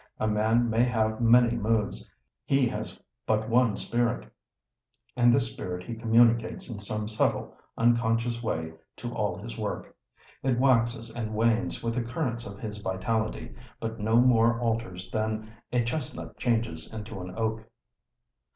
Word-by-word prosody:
A 110 - +1
man 110 +3 +2
may 115 +1 +3
have 110 -2 +1
many 120 0 +5
moods, 110 -1 -1 0.3
he 135 -2 +3
has - - -6 0.3
but 110 0 +1
one 115 -2 +3
spirit; 120 - -1 0.9
and 120 -1 +5
this 120 -2 +1
spirit 90 -1 -5
he 120 - -5
communicates 115 +1 +3
in 105 - -6
some 105 +1 -3
subtle, 110 0 0 0.2
unconscious 115 0 +2
way 80 -8 -2 0.2
to - - -5
all - - -1
his - - -8
work. - - -4 0.5
It 130 -2 +1
waxes 120 -3 +2
and 110 -2 -4
wanes 115 +3 +1
with 115 0 0
the 125 - 0
currents 120 -1 -3
of 100 0 -8
his 105 -1 -6
vitality, 110 +3 -2 0.3
but 115 0 -4
no 110 +2 +1
more 120 -2 +4
alters 110 -6 -2
than 110 0 -2 0.2
a 125 -1 +2
chestnut 125 +3 -4
changes 115 -9 -1
into 110 -2 -6
an 90 0 -7
oak. 110 -1 -2
115 Hz, 150 wpm, -28 LUFS, 110-120 Hz, 0.9 s, many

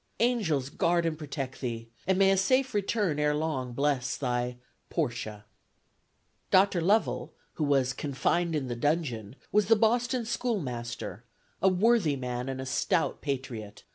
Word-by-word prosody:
Angels 195 - +1
guard 170 +3 +1
and 165 -1 0
protect 140 -4 -5
thee; 115 -3 -4 0.2
and 190 -1 +3
may 195 0 +5
a - - +4
safe 255 +7 +2
return 205 -6 0
ere 150 0 +2
long 140 -5 -2
bless 140 -1 0
thy 125 -2 -1 0.3
"PORTIA." 115 -8 -3 1.0
Dr. 190 -2 +4
Lovell, 205 +6 +1 0.2
who 155 - -2
was 135 -2 +2
"confined 160 +5 0
in 140 -4 -1
the 120 - -3
dungeon," 125 -6 -1 0.2
was 210 -1 +3
the 225 - +6
Boston 235 +2 +2
schoolmaster, 125 - -3 0.4
a 190 - +5
worthy 190 -4 +3
man, 125 -1 -3
and 130 -1 -4
a 130 - -4
stout 165 +6 0
patriot. 125 -7 -5
150 Hz, 145 wpm, -29 LUFS, 125-190 Hz, 1.0 s, the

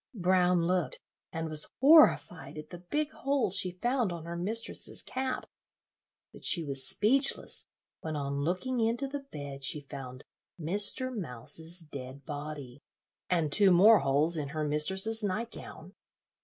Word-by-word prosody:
Brown 180 -2 +2
looked, 180 -1 -1 0.3
and 160 0 -4
was 155 -1 +2
horrified 235 - +4
at 150 0 -9
the 175 - -8
big 295 - -2
hole 275 -7 -1
she 180 -1 +1
found 240 -5 +1
on 170 -2 -7
her 170 0 -6
mistress's 210 +7 -3
cap; 260 0 -3 0.9
but - - -14
she 170 - +2
was 135 -3 +2
speechless 265 +6 +2 0.3
when 160 -1 -5
on 140 -1 -3
looking 185 - -2
into 230 +4 0
the 285 +1 -5
bed 145 - -9
she 150 +2 0
found 135 -3 -9 0.4
Mr. 205 - 0
Mouse's 165 - -7
dead 140 -3 -9
body, 145 -3 -7 0.5
and 165 -5 +1
two 200 +4 +5
more 200 +5 +7
holes 145 +5 +3
in 150 -2 -3
her 155 +2 -4
mistress's 190 +9 +1
night 215 +4 -2
gown. - - -11
175 Hz, 145 wpm, -30 LUFS, 150-225 Hz, 0.9 s, more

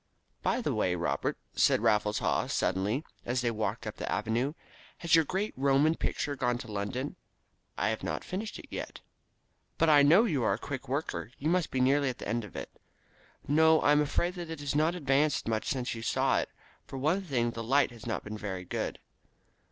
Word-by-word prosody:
"By - - +1
the - - -1
way, 90 - +1
Robert," 85 -1 -1 0.2
said - - +4
Raffles 105 0 +2
Haw - - 0
suddenly, 100 - 0 0.2
as 125 +1 -1
they 120 -1 +1
walked 110 +1 -2
up 110 - -5
the - - -4
Avenue. 115 +6 0 0.4
"Has 170 - -2
your 165 -1 +7
great 195 +7 -2
Roman 140 +4 +3
picture 145 -3 -2
gone 125 -3 0
to 115 - -8
London?" 105 +7 -3 0.6
"I 105 - +1
have 110 - -2
not - - -3
finished 210 +4 -5
it - - -10
yet." - - -6 0.8
"But 165 -1 +4
I 145 -1 +7
know 165 +10 +6
that 235 - 0
you 140 -4 +1
are 105 - +3
a - - -1
quick 130 +1 -6
worker. 140 -1 -2
You 155 +4 0
must 180 -2 +1
be 130 - -2
nearly 135 +2 +3
at 125 - -5
the - - -7
end 115 +2 -1
of 105 - -11
it." 65 -3 -6 0.8
"No, 160 +2 +5
I 145 - +4
am 150 0 +5
afraid 170 +4 0
that 175 -2 -7
it 160 -2 -5
has 145 -1 -2
not 155 +4 +2
advanced 145 -3 +1
much 110 -1 -1
since 130 -4 -1
you 115 - -6
saw 115 - +2
it. - - -3 0.4
For 135 - -7
one 155 +9 +1
thing, 125 -10 0
the 115 - -6
light 135 +3 +3
has 120 -1 -11
not 115 - -2
been 105 0 -6
very 95 -3 -5
good." - - -3
135 Hz, 215 wpm, -30 LUFS, 110-155 Hz, 0.8 s, your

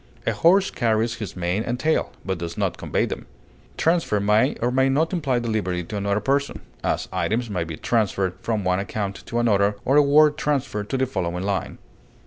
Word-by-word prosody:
A - - +1
horse 190 +3 +4
carries 115 0 +1
his 105 - -6
mane 90 +3 -1
and 120 +2 -3
tail, 160 +2 +1
but 95 -2 -2
does 85 0 -5
not - - 0
convey - - -1
them. - - -6 0.5
Transfer 165 -10 +2
may 105 +2 +3
or 120 +1 -1
may 130 +1 +3
not 160 +6 +1
imply 145 -8 0
delivery 105 -7 -1
to 105 - -7
another 100 +1 0
person; 140 +5 -1 0.2
as, - - -1
items 115 +1 -1
may 90 -4 -1
be 80 -2 -7
transferred 100 -5 0
from 110 -3 -1
one 90 0 +1
account 100 0 -4
to 120 - -3
another 105 -3 +2
or 135 +3 +3
a - - +8
word 150 +1 +5
transferred 135 -8 -1
to 135 - 0
the 130 - +2
following 90 -7 -3
line. 100 -1 -2
110 Hz, 195 wpm, -23 LUFS, 100-135 Hz, 0.5 s, a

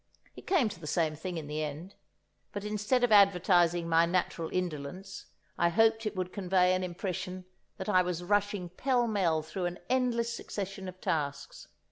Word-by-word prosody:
(It - - -13
came 350 - +3
to 205 -4 -7
the 155 - -8
same 155 0 +1
thing 175 +3 -5
in 160 - -5
the 150 +1 -3
end; 155 +6 -6 0.6
but 205 - -4
instead 210 +4 0
of 245 - +3
advertising 180 -4 +4
my 165 0 +4
natural 170 -2 -1
indolence, 180 +2 -4 0.3
I 170 - +4
hoped 225 +3 +3
it 210 - -4
would 185 -1 -3
convey 185 -2 +2
an 185 0 0
impression 185 0 -4 0.3
that 190 - -6
I 185 -3 +4
was 180 -1 -3
rushing 205 -1 0
pell 245 +6 +1
mell 175 -8 +1
through 180 +3 -4
an 175 - -5
endless 235 -2 +1
succession 195 -3 -5
of 185 0 -9
tasks.) 145 -2 -3
185 Hz, 175 wpm, -30 LUFS, 170-205 Hz, 0.6 s, advertising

